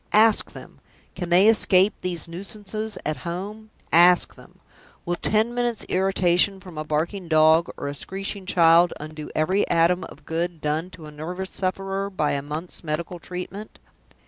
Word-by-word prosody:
Ask 215 0 +4
them! - - -12 0.3
Can 175 -2 -5
they 180 +4 +5
escape 200 -3 +4
these 175 -3 -3
nuisances 205 +4 -6
at 155 0 -1
home? 200 +5 -6 0.2
Ask 175 +2 +5
them! - - -18 0.5
Will 175 - -1
ten 220 +6 +1
minutes' 240 -2 -1
irritation 190 0 +2
from 185 -3 -12
a 155 - -3
barking 165 +5 -2
dog 160 +1 +4
or - - -4
a 140 - -3
screeching 195 +5 -4
child 170 -1 +5
undo 155 0 -8
every 185 +6 +1
atom 175 +2 +3
of - - -14
good 170 +1 -3
done 155 +4 -2
to 170 -4 -12
a 150 - -10
nervous 180 +5 -6
sufferer 195 +1 -2
by 170 -6 -1
a 140 - -1
month's 155 +6 -5
medical 170 +3 -4
treatment? 185 +5 -8
180 Hz, 160 wpm, -24 LUFS, 165-195 Hz, 0.5 s, they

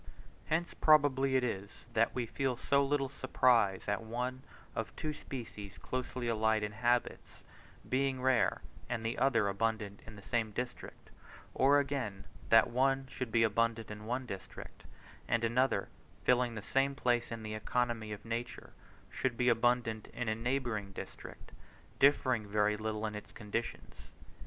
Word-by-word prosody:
Hence 165 +2 0
probably 135 -3 +4
it 130 - +3
is, 100 -4 -4
that 115 0 +2
we 125 -2 0
feel 130 +1 -1
so 140 +2 +2
little 140 0 +1
surprise 125 -7 +2
at 100 +1 0
one, 125 +3 -3 0.3
of 115 - -4
two 155 -1 -3
species 110 -8 -8
closely 130 -1 -4
allied 110 -1 +2
in 105 - -2
habits, 120 +2 -1 0.4
being 135 0 +1
rare 130 -2 +2 0.3
and 115 -2 -2
the 115 - -1
other 120 -5 +3
abundant 105 0 -1
in 115 - -10
the 100 - -12
same 115 0 0
district; 125 +1 -6 0.4
or, 140 +2 +5
again, 135 -9 -2 0.3
that 115 +1 +6
one 135 +2 +2
should 125 -3 -4
be 115 0 +4
abundant 115 0 +1
in 105 0 -8
one 125 +2 -1
district, 95 -6 -9 0.4
and 115 0 +1
another, 120 -3 +2 0.4
filling 125 -1 +3
the 105 - -6
same 135 +4 +1
place 120 -3 +1
in 115 -1 -5
the 110 0 -5
economy 115 0 -1
of 105 - -7
nature, 120 +2 -5 0.4
should 130 -3 -1
be 125 0 +3
abundant 115 -2 +1
in 125 -1 -3
a 110 - +2
neighbouring 115 -3 -2
district, - - -9 0.5
differing 130 -6 +4
very 105 +1 +2
little 110 0 -3
in 105 - -3
its 105 -1 -8
conditions. 115 +1 -4
120 Hz, 155 wpm, -33 LUFS, 110-130 Hz, 0.5 s, that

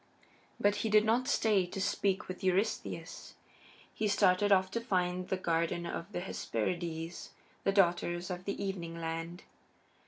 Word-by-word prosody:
But 205 0 +3
he 220 - -1
did 215 0 +5
not 240 +4 +2
stay 210 -9 +3
to 185 - -6
speak 195 0 0
with 185 +1 -7
Eurystheus. 190 +3 -1 0.6
He 215 - 0
started 205 0 +3
off 190 -1 +4
to 230 - -2
find 180 -4 0
the 190 - 0
Garden 170 -1 0
of 170 +2 -5
the 175 - -3
Hesperides, 165 - -3 0.3
the 195 - +3
Daughters 175 -2 +2
of 180 +1 -5
the 200 - -3
Evening 170 -4 -4
Land. 165 +2 -4
185 Hz, 150 wpm, -32 LUFS, 175-200 Hz, 0.6 s, did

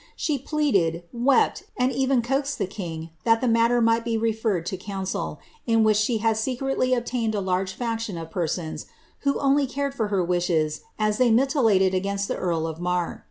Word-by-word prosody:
She 295 -3 -1
pleaded, 200 - +1
wept, 250 +3 +2 0.2
and 255 0 +2
even 265 -1 +1
coaxed 275 +3 -1
the - - 0
king 170 -5 -6
that 225 0 +4
the 255 - 0
matter 230 +1 +3
might 230 0 +3
be 230 -1 -1
n 220 - -1
ferred 215 -6 -1
to 190 - -3
council, 190 0 -4 0.3
in 225 -1 +4
which 215 -1 +4
she 220 +2 +1
had 220 0 +1
secretly 255 +2 0
obtained 235 -2 -1
a - - 0
large 190 0 -1
faction 225 -5 -3
of 165 -1 -7
persons, 160 -3 -3 0.3
who 280 0 0
only 275 0 +3
cared 280 +1 -2
for 225 -6 -1
her 195 -3 +1
wishes 170 -3 0 0.2
as 215 0 0
they 250 -1 +5
militated 225 - +3
against 200 +1 -1
the - - -2
earl 170 -3 -1
of 160 0 -5
Marr. 180 -1 -1
220 Hz, 190 wpm, -24 LUFS, 185-250 Hz, 0.3 s, they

